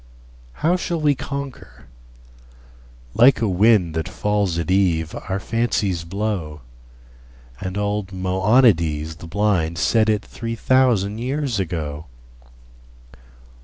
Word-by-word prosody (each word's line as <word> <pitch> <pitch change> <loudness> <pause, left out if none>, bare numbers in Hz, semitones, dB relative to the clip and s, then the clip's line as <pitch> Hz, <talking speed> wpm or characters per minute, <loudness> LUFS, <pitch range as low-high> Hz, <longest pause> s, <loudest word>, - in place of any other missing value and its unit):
How 175 +3 +3
shall 175 -2 -3
we 150 -2 +3
conquer? 135 - -7 1.3
Like 125 +3 +5
a 115 - +1
wind 95 -3 +3
That 80 +3 -3
falls 100 -2 -1
at 85 +1 -2
eve 85 -4 +1 0.2
our 95 +1 -1
fancies 105 -7 -1
blow, 90 -5 -3 1.0
And 95 +1 -5
old 105 -1 -2
Moeonides 95 - +2
the 85 - -10
blind 90 -4 0
Said 110 +6 +2
it 105 -1 0
three 115 0 -5
thousand 115 -5 +2
years 130 -2 -2
ago. 80 -4 -4
100 Hz, 110 wpm, -21 LUFS, 85-115 Hz, 1.3 s, Like